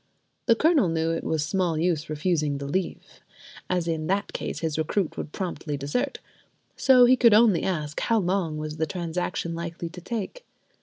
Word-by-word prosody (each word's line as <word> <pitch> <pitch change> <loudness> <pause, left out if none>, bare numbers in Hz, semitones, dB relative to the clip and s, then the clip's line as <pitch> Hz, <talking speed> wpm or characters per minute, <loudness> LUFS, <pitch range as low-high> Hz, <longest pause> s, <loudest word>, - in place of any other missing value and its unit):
The 230 - +6
Colonel 300 - +3
knew 165 0 0
it 165 - -2
was 155 -2 0
small 175 -1 0
use 165 -1 0
refusing 155 -2 0
the 140 - -5
leave, 180 +6 -4 0.5
as 180 -2 0
in 160 -2 -2
that 195 +2 -1
case - - -4
his 160 -2 -1
recruit 165 +3 -1
would - - -6
promptly 165 -5 -4
desert; 145 - -2 0.6
so 255 -2 +6
he 255 +1 +6
could 235 -4 +6
only 215 -6 +5
ask, 150 -5 -2
how 230 - +1
long 180 -5 0
was 155 0 -5
the 160 0 0
transaction 175 -1 -3
like 170 0 -5
to 170 - -4
take? 230 - -5
170 Hz, 175 wpm, -26 LUFS, 155-195 Hz, 0.6 s, The